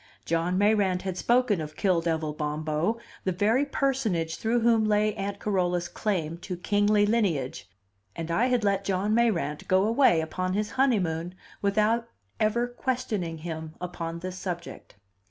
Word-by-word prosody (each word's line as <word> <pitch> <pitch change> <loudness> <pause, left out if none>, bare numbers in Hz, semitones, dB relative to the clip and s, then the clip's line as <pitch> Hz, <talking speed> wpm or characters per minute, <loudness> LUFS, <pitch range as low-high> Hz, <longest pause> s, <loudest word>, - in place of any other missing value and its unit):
John 170 +2 0
Mayrant 200 -3 +2
had 190 -2 -3
spoken 235 -2 +2
of 155 0 -7
Kill 185 -4 +2
devil 160 -2 -1
Bombo, 155 +7 -1 0.3
the 190 - 0
very 220 +10 +2
personage 225 - 0
through 230 +2 +1
whom 230 -1 +4
lay 210 0 +2
Aunt 200 -1 -4
Carola's 180 -4 0
claim 170 -4 -2
to 180 0 -5
kingly 205 +3 +3
lineage, 165 - 0 0.5
and 165 0 -4
I 230 +9 +2
had 250 -3 +1
let 200 -1 +1
John 195 +2 0
Mayrant 215 -10 +1
go 185 +1 +4
away 225 -5 +4
upon 185 +3 -2
his 210 +1 -1
honeymoon 180 -10 +1 0.3
without 215 +3 +2 0.3
ever 220 +3 +2
questioning 230 -9 -2
him 160 -1 -6
upon 170 -2 -5
this 185 0 -5
subject. 175 - -6
190 Hz, 150 wpm, -27 LUFS, 170-220 Hz, 0.5 s, whom